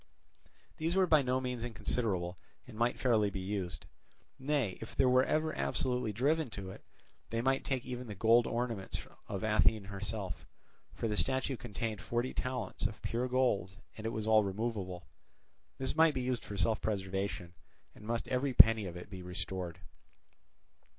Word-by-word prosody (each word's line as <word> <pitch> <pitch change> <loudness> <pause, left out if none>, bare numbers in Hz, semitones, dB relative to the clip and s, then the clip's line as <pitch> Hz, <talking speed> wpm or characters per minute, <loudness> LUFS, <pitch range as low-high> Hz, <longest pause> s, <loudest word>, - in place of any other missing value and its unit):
These 165 +3 0
were 190 -1 +5
by 155 -4 +5
no 130 -1 +1
means 125 -2 -3
inconsiderable, 100 -7 -2 0.3
and 125 - -12
might 120 +2 +1
fairly 110 -5 +3
be 95 - -5
used. 95 -4 -4 0.5
Nay, 135 -8 0
if 115 - -8
they - - +4
were 130 0 +5
ever 155 +2 0
absolutely 125 -3 +1
driven 145 +6 +1
to 95 -1 -5
it, - - -12 0.5
they 115 - -1
might 135 +3 +2
take 130 -2 -1
even 125 -1 -5
the 105 - -6
gold 115 +4 +5
ornaments 115 -5 -2 0.2
of 100 +1 -4
Athene 110 0 +3
herself; 100 0 -4 0.5
for - - -1
the 105 - -1
statue 130 +3 0
contained 115 -2 -4
forty 120 +2 -1
talents 125 -4 -2
of 105 - -10
pure 120 +2 -1
gold 125 -8 +1 0.2
and 110 +1 -4
it - - -1
was 110 -1 -3
all 110 -1 +5
removable. 100 -4 -3 0.7
This 130 +1 0
might 160 -2 +5
be 130 - 0
used 125 -2 -1
for 100 - -6
self 110 +4 +1
preservation, 95 -4 -2 0.4
and - - -15
must 115 +2 -2
every 130 0 0
penny 110 -4 +8
of 90 0 -6
it 90 - -8
be 95 -3 -8
restored. 90 -1 -4
115 Hz, 170 wpm, -33 LUFS, 100-125 Hz, 0.7 s, penny